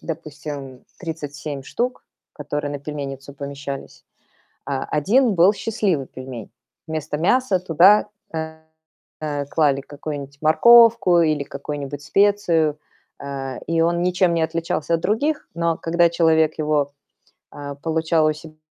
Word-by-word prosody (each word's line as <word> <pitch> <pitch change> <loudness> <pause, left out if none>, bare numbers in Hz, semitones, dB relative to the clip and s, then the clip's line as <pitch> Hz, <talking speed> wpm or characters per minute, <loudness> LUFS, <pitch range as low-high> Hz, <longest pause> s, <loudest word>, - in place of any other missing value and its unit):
допустим, 150 -5 -7
37 145 -4 -6
штук, 245 - -3 0.3
которые 145 0 -4
на 145 - -4
пельменницу 140 -1 -7
помещались, 140 -1 -7 0.7
э, - - -2
1 200 - +2
был 185 +4 +5
счастливый 200 - -1
пельмень. 130 -4 -9 0.4
Вместо 155 -1 -3
мяса 195 +3 +2
туда, 185 +5 +5 0.3
э, 160 0 -4 0.6
э, 145 -2 -2
клали 145 -2 +2
какую-нибудь 140 -1 -7
морковку 230 +2 +6
или 155 -3 +1
какую-нибудь 145 0 -6
специю, 170 -5 +2 0.4
э, 135 -2 -5
и 165 +1 +1
он 170 +1 +2
ничем 180 -1 +2
не 165 - +1
отличался 165 0 -1
от 165 - -4
других. 290 - 0
Но 170 -1 0
когда 170 +1 +2
человек 160 -2 +2
его, 150 -2 0 0.6
э, 145 -1 -6
получал 160 0 +1
у 155 - +2
себя 155 0 -13
155 Hz, 125 wpm, -22 LUFS, 145-170 Hz, 0.7 s, морковку